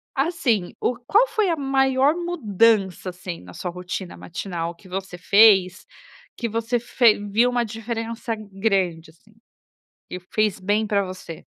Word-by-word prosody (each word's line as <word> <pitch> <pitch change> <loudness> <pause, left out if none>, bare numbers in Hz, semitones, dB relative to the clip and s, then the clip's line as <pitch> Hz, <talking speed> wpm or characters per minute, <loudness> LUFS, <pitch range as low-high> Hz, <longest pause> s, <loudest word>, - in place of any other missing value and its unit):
Assim, 270 - 0
o 250 - 0
qual 435 - +4
foi 430 -5 0
a 330 - 0
maior 270 +1 +2
mudança 225 - +1
assim 180 -1 -7
na 90 -1 -13
sua 180 - -5
rotina 180 +1 -6
matinal 170 -1 -5
que 175 +3 -19
você 190 0 -6
fez 190 -1 +5 0.5
que 235 - -2
você 230 +2 -1
fe 235 -2 +3
viu 225 +5 +3
uma 245 -1 0
diferença 225 +1 -4
grande, 195 -5 -1
assim 200 +7 -23 0.7
e 180 - -5
fez 210 +3 -1
bem 205 +3 0
pra 200 -1 +1
você? 185 -3 -9
210 Hz, 145 wpm, -23 LUFS, 185-240 Hz, 0.7 s, fez